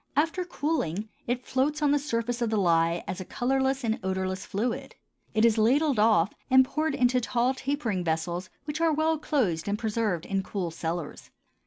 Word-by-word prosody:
After 325 +5 +1
cooling, 285 - -2 0.2
it 245 +1 -2
floats 285 +4 0
on 295 -2 +2
the 290 - +3
surface 245 -3 -2
of 235 - +1
the 220 - 0
lye 170 -2 +2
as 190 0 -4
a - - -3
colorless 265 +5 0
and 225 -1 0
odorless 190 0 -2
fluid; 230 +4 -3 0.4
it 220 +1 +4
is 225 -1 +3
ladled 265 +3 +3
off 210 -4 +4 0.2
and 260 0 +7
poured 305 +2 -1
into 250 0 +3
tall 245 +2 +1
tapering 260 -9 -2
vessels 170 +3 -2 0.2
which 305 +1 -4
are 330 -1 +4
well 315 +1 +1
closed 205 - 0
and 205 +1 0
preserved 215 -6 -1
in 195 -1 -1
cool 185 -3 -4
cellars. 165 -1 -5
230 Hz, 180 wpm, -27 LUFS, 190-275 Hz, 0.4 s, and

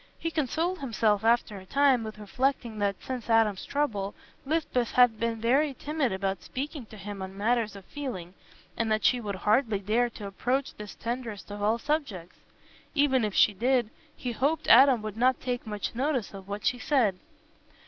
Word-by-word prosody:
He 330 - -3
consoled 325 +4 -1
himself 220 -5 +1
after 230 -2 +2
a 190 - -13
time 275 -1 +3
with 215 -1 -7
reflecting 235 +1 -1
that, 200 -1 +1
since 255 -3 -5
Adam's 225 -4 +3
trouble, 210 -9 -1 0.3
Lisbeth 280 -6 0
had 245 -3 +5
been 230 -1 -1
very 270 +5 +2
timid 295 -4 -1
about 190 -1 -2
speaking 275 -2 -5
to 215 - -12
him 200 -1 -7
on 190 +1 -7
matters 220 0 +1
of 195 -2 -11
feeling, 230 -12 -6 0.4
and 225 -1 -1
that 215 0 +1
she 250 -1 +4
would 205 -3 -4
hardly 215 +3 +2
dare 220 +5 +1
to 215 -3 -9
approach 250 +7 -1
this 210 -2 -9
tenderest 230 -4 -5
of 205 0 -6
all 215 +3 +2
subjects. 235 - -3 0.6
Even 275 -4 +3
if 210 -2 -2
she 210 - +5
did, 240 +1 +1 0.3
he 250 - -3
hoped 280 +7 0
Adam 255 -1 +7
would 215 -1 -5
not 255 +2 +3
take 245 -2 -3
much 210 -2 -3
notice 255 -3 -1
of 195 -1 -10
what 205 +1 -5
she 250 - +1
said. 235 -10 +2
230 Hz, 180 wpm, -28 LUFS, 205-260 Hz, 0.6 s, Adam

